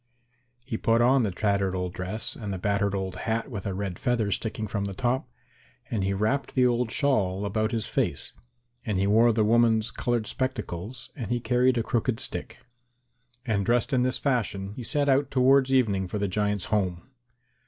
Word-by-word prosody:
He 120 -4 -3
put 115 0 +3
on 130 +3 +4
the 110 - +1
tattered 100 0 0
old 90 -1 -3
dress 95 +4 -4
and 105 -3 -5
the 95 - -3
battered 100 +1 0
old 95 -1 -3
hat 115 +5 -2
with 100 -5 -5
a 100 - -2
red 95 -3 -4
feather 115 -4 0
sticking 110 +1 -2
from 100 -1 -2
the 100 -1 -5
top, 125 +5 -1 0.6
and 105 -4 0
he 95 - 0
wrapped 110 +8 -1
the 130 -1 +4
old 120 -1 +1
shawl 105 -8 +1
about 110 +2 0
his 115 -3 -1
face, - - -1 0.5
and 105 -4 -1
he 95 - +2
wore 115 +4 +5
the 110 -1 +2
woman's 115 0 +3
coloured 120 -2 -1
spectacles 115 -3 -4
and 120 -8 -5
he 120 - 0
carried 125 +1 +2
a 115 - +1
crooked 115 0 0
stick. - - -5 0.9
And 105 -4 0
dressed 120 +4 +1
in 125 - +3
this 125 +1 +1
fashion 105 -7 -1
he 125 - -7
set 145 +4 0
out 135 0 +3
towards 135 0 +4
evening 105 -8 +2
for 105 - -4
the 100 0 0
giants' 105 0 -1
home. 90 -4 -1
110 Hz, 190 wpm, -27 LUFS, 100-125 Hz, 0.9 s, wore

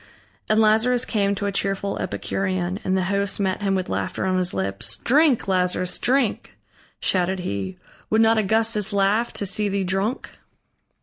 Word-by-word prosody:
And 215 0 +3
Lazarus 225 +3 +3
came 200 -4 0
to 205 - -3
a 200 - 0
cheerful 195 0 -1
Epicurean, 185 -1 -2
and 190 0 +1
the 185 - +1
host 200 +2 0
met 190 0 -1
him 195 -1 +1
with 185 -1 -2
laughter - - -2
on 185 -1 +1
his 180 -1 +2
lips: 95 +2 -3
"Drink, 280 -3 +3
Lazarus, 180 -1 0
drink!" 255 -2 0 0.4
shouted 185 0 0
he. 95 - -4 0.3
"Would 220 +1 +3
not 225 0 +4
Augustus 220 0 +1
laugh 200 +4 +2
to 205 - -3
see 205 +2 0
thee 195 0 -1
drunk!" 195 +6 -2
200 Hz, 165 wpm, -23 LUFS, 185-220 Hz, 0.4 s, not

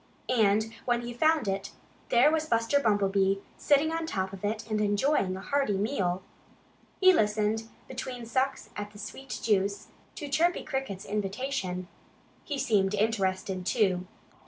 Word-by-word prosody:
And 220 -2 +3
when 240 -1 +1
he 240 0 -5
found 310 0 +2
it, 195 0 -2 0.4
there 245 +5 +5
was 315 -1 0
Buster 230 +2 +2
Bumblebee, 195 -4 +2 0.2
sitting 295 +2 +3
on 325 0 -2
top 190 -7 -2
of 195 - -9
it 215 +1 -2
and 215 -1 0
enjoying 205 -2 +1
a - - -7
hearty 275 -4 0
meal. 190 -4 -1 0.8
He 375 -1 +7
listened, 215 -2 +1 0.2
between 250 -2 -6
sucks 260 +4 -1
at 205 0 -4
the - - -12
sweet 220 +6 -7
juice, 200 -1 +1 0.3
to 295 - -5
Chirpy 330 +5 +2
Cricket's 265 -10 -4
invitation. 195 -2 -2 0.6
He 290 - -3
seemed 205 -6 +2
interested, 190 -3 0
too. 185 -3 +1
215 Hz, 145 wpm, -29 LUFS, 195-265 Hz, 0.8 s, He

